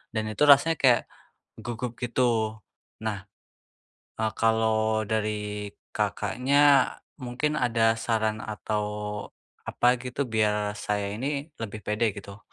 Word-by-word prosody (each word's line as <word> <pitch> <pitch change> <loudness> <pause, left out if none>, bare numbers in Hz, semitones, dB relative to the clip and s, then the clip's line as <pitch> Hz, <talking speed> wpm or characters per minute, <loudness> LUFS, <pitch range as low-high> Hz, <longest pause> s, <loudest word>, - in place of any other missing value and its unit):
Dan 110 - 0
itu 150 +8 +2
rasanya 145 +3 +6
kayak 125 -3 +5 0.6
gugup 120 0 -4
gitu. 115 -3 0 0.4
Nah, 105 -4 -3 0.9
eee, 110 0 -1
kalau 110 -1 +2
dari 105 -1 -2 0.2
Kakaknya 140 +3 +3 0.2
mungkin 130 +4 -2
ada 115 -2 +2
saran 110 -2 0
atau 105 0 -3 0.8
apa 125 0 +2
gitu? 125 +3 -3
Biar 105 -1 +1
saya 105 -1 -2
ini 140 +7 -3
lebih 110 -1 -5
pede 105 +1 0
gitu. 100 +1 -10
110 Hz, 110 wpm, -27 LUFS, 105-125 Hz, 0.9 s, rasanya